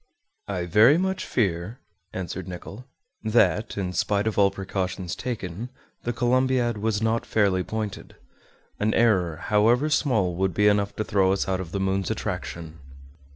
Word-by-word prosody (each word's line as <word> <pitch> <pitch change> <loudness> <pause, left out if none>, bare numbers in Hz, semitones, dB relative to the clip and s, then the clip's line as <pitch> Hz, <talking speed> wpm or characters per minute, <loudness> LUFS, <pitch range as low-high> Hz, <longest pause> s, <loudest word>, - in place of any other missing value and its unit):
"I 90 -3 -2
very 110 - +6
much 190 +1 -1
fear," 95 0 -1 0.3
answered 95 0 -5
Nicholl, 100 +6 -8 0.4
"that, 110 -1 +2
in 90 -2 -2
spite 100 +3 0
of 110 - -1
all 100 -1 +5
precautions 95 -2 -4
taken, 110 -2 -5 0.4
the 120 - 0
Columbiad 125 -1 +1
was 110 0 -1
not 115 +1 +1
fairly 100 -4 +1
pointed. 110 -1 -5 0.6
An 105 +1 +1
error, 95 -8 +3
however 115 - +2
small, 110 - +2
would 95 -2 0
be 105 0 +4
enough 100 -1 +2
to 110 - -1
throw 95 -2 +2
us 100 - -1
out 95 -1 0
of 85 -3 -8
the 100 - -2
moon's 95 0 0
attraction." 85 -6 -5
105 Hz, 155 wpm, -25 LUFS, 95-115 Hz, 0.6 s, very